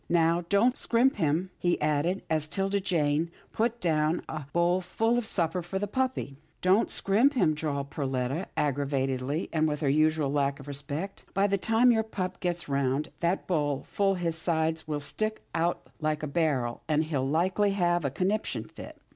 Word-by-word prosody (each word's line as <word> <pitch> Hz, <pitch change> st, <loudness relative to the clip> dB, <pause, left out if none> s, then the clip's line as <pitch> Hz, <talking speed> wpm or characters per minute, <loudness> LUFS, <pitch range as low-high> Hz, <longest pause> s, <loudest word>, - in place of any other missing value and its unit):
" -, -, -38 dB
Now 170 Hz, 0 st, +3 dB
don't 230 Hz, +5 st, +4 dB
scrimp 245 Hz, +3 st, +2 dB
him," 165 Hz, +4 st, 0 dB
he 175 Hz, 0 st, +1 dB
added, 155 Hz, +5 st, 0 dB
as 155 Hz, -1 st, 0 dB
'Tilda 195 Hz, +4 st, 0 dB
Jane 160 Hz, -3 st, +1 dB, 0.2 s
put 235 Hz, +1 st, 0 dB
down 155 Hz, -2 st, +1 dB
a 150 Hz, -3 st, -6 dB
bowl 175 Hz, +2 st, +2 dB
full 225 Hz, +6 st, 0 dB
of 240 Hz, -2 st, -1 dB
supper 170 Hz, -2 st, 0 dB
for 175 Hz, +3 st, -4 dB
the 200 Hz, -, -1 dB
puppy. 250 Hz, -, -2 dB, 0.3 s
Don't 190 Hz, +5 st, +4 dB
scrimp 230 Hz, +9 st, +3 dB
him," 155 Hz, -11 st, +3 dB
drawled 145 Hz, -2 st, -3 dB
Perletta, 135 Hz, +4 st, -2 dB
aggravat 140 Hz, -2 st, 0 dB
ingly, 135 Hz, +5 st, -2 dB
and 155 Hz, -1 st, +2 dB
with 150 Hz, -1 st, -2 dB
her 145 Hz, -, +2 dB
usual 155 Hz, 0 st, +2 dB
lack 140 Hz, 0 st, 0 dB
of 140 Hz, -, -11 dB
respect. 145 Hz, +7 st, -5 dB
" -, -, -31 dB
By 195 Hz, +1 st, +3 dB
the 200 Hz, -1 st, +1 dB
time 225 Hz, +5 st, +4 dB
your 220 Hz, -1 st, +3 dB
pup 185 Hz, -4 st, -4 dB
gets 175 Hz, -1 st, -2 dB
round 140 Hz, +2 st, 0 dB
that 175 Hz, +3 st, 0 dB
bowl 145 Hz, -6 st, 0 dB
full 195 Hz, -1 st, +1 dB
his 170 Hz, -2 st, -1 dB
sides 160 Hz, -1 st, 0 dB
will 150 Hz, -1 st, -2 dB
stick 215 Hz, +9 st, -2 dB
out 170 Hz, +1 st, 0 dB
like 155 Hz, -1 st, -1 dB
a -, -, -1 dB
barrel, 140 Hz, -6 st, 0 dB
an' 155 Hz, 0 st, +2 dB
he'll 155 Hz, -4 st, -1 dB
likely 185 Hz, +7 st, +2 dB
have 175 Hz, -3 st, +1 dB
a 140 Hz, -, +1 dB
conniption 190 Hz, +10 st, -1 dB
fit." -, -, -11 dB
165 Hz, 190 wpm, -28 LUFS, 145-190 Hz, 0.3 s, don't